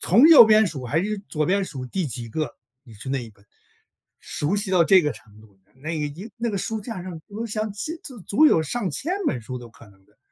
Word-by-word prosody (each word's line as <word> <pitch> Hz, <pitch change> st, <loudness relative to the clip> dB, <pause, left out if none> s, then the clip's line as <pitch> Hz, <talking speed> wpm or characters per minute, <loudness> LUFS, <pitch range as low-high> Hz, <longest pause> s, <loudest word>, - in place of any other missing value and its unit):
从 235 Hz, -, +6 dB
右 320 Hz, -7 st, +10 dB
边 215 Hz, 0 st, +5 dB
数 135 Hz, -8 st, -6 dB
还 150 Hz, +8 st, 0 dB
是 210 Hz, +1 st, -2 dB
左 155 Hz, -2 st, -1 dB
边 195 Hz, +2 st, +1 dB
数 130 Hz, -8 st, -7 dB
第 180 Hz, +6 st, -2 dB
几 120 Hz, -2 st, -6 dB
个， 150 Hz, +2 st, -4 dB, 0.3 s
你 125 Hz, -5 st, -16 dB
是 110 Hz, +6 st, -9 dB
那 135 Hz, -1 st, -1 dB
一 115 Hz, -, -12 dB
本。 100 Hz, 0 st, -26 dB, 0.7 s
熟 150 Hz, +7 st, -2 dB
悉 205 Hz, 0 st, -2 dB
到 180 Hz, -2 st, +5 dB
这 190 Hz, +2 st, +6 dB
个 150 Hz, -1 st, 0 dB
程 105 Hz, -3 st, -17 dB
度， 100 Hz, -3 st, -21 dB, 0.2 s
那 150 Hz, +5 st, -6 dB
一 155 Hz, +6 st, -4 dB
那 235 Hz, 0 st, -2 dB
个 200 Hz, -, -2 dB
书 220 Hz, +3 st, -3 dB
架 205 Hz, -4 st, -6 dB
上， 175 Hz, -3 st, -7 dB
我 220 Hz, +3 st, -5 dB
想 215 Hz, -1 st, -3 dB
千 210 Hz, +11 st, -5 dB
足 255 Hz, -5 st, -9 dB
足 205 Hz, -, +3 dB
有 165 Hz, -, +4 dB
上 195 Hz, +4 st, -2 dB
千 310 Hz, -, -2 dB
本 125 Hz, -, 0 dB
书 125 Hz, +3 st, -7 dB
都 120 Hz, -, -11 dB
可 115 Hz, -, -17 dB
能 95 Hz, -1 st, -23 dB
的。 -, -, -32 dB
170 Hz, 260 characters per minute, -23 LUFS, 130-215 Hz, 0.7 s, 右